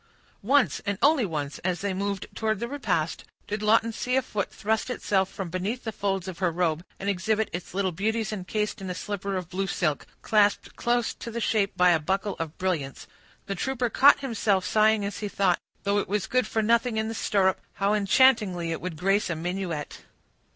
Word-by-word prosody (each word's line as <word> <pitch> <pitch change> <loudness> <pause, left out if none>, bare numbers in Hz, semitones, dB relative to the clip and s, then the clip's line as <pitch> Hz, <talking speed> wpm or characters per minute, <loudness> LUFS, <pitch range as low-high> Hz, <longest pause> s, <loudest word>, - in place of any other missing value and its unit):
Once, 270 +5 +2
and 200 -1 -2
once 290 -2 +5
only, 145 -3 -3 0.2
as 175 -2 -2
they 200 -1 -1
moved 200 +1 -2
towards 220 -2 -1
the 235 - -2
repast, 215 - -1 0.2
did 210 +1 -3
Lawton 225 +2 +3
see 250 +3 -1
a 265 - +3
foot 200 -2 -3
thrust 220 +4 -1
itself 195 -6 0
from 185 -4 -5
beneath 200 +7 -3
the 220 - -3
folds 195 -2 -2
of 185 -3 -6
her 185 -2 +2
robe, 165 -1 0 0.2
and 195 - -5
exhibit 210 +3 0
its 175 +1 -6
little 190 -1 +1
beauties 215 +4 -1
encased 210 +2 -3
in 190 - -5
a 180 - -3
slipper 200 0 -3
of 180 -3 -4
blue 190 +1 -1
silk, 155 -6 -1 0.2
clasped 210 -2 +2
close 240 -1 0
to - - -8
the 235 +1 -4
shape 205 -4 0
by 180 0 +6
a 165 - +3
buckle 190 +5 -1
of 165 -1 -5
brilliants. 160 -8 -2 0.4
The 195 - -3
trooper 245 +3 -1
caught 280 +1 +6
himself 215 -7 0
sighing 215 +1 +3
as 200 0 -4
he 210 - -3
thought, 195 -3 +1 0.2
though 200 0 +2
it 200 - -4
was 205 0 0
good 255 -3 +1
for 220 0 0
nothing 235 +1 +2
in 220 0 0
the 225 - -3
stirrup, 195 -3 +1
how 200 +1 +1
enchantingly 205 -5 +3
it 165 - -3
would 180 -3 -5
grace 195 +4 +1
a 170 - -1
minuet. 175 -2 -4
200 Hz, 205 wpm, -26 LUFS, 185-220 Hz, 0.4 s, by